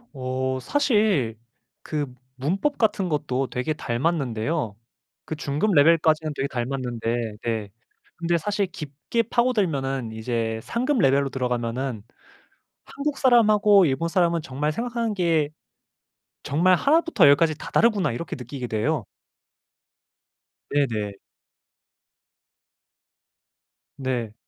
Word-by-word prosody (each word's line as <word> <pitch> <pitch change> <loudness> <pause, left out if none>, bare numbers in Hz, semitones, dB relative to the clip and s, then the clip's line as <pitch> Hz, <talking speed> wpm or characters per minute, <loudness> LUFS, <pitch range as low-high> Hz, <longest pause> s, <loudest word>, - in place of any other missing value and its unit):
어 130 0 -2
사실 205 - +1 0.4
그 150 -2 -2 0.3
문법 185 - -1
같은 210 -4 +1
것도 140 -4 -1
되게 125 +5 -2
닮았는데요. 135 -3 -1 0.5
그 160 - -4
중급 150 +7 0
레벨까지는 155 0 +4
되게 140 - -1
닮았는데 120 -3 -3
네. 110 -3 -2 0.5
근데 170 0 +1
사실 205 +3 -1
깊게 155 - -3
파고들면은 160 - 0
이제 110 0 -2
상급 255 - -1
레벨로 135 -3 +3
들어가면은 125 -2 -2 0.8
한국 285 0 -3
사람하고 215 -6 +5
일본 140 +4 0
사람은 170 -1 +2
정말 145 +4 -2
생각하는 235 +3 -2
게 165 -6 +1 0.9
정말 175 +6 +3
1 290 - +4
부터 320 - +3
10 140 - +8
까지 155 -2 +1
다 - - -9
다르구나 215 - +3
이렇게 140 +8 -5
느끼게 125 0 -6
돼요. 120 +3 -1 1.7
네네. 115 -8 0 2.8
네. 125 -5 -3
145 Hz, 235 characters per minute, -24 LUFS, 125-190 Hz, 2.8 s, 10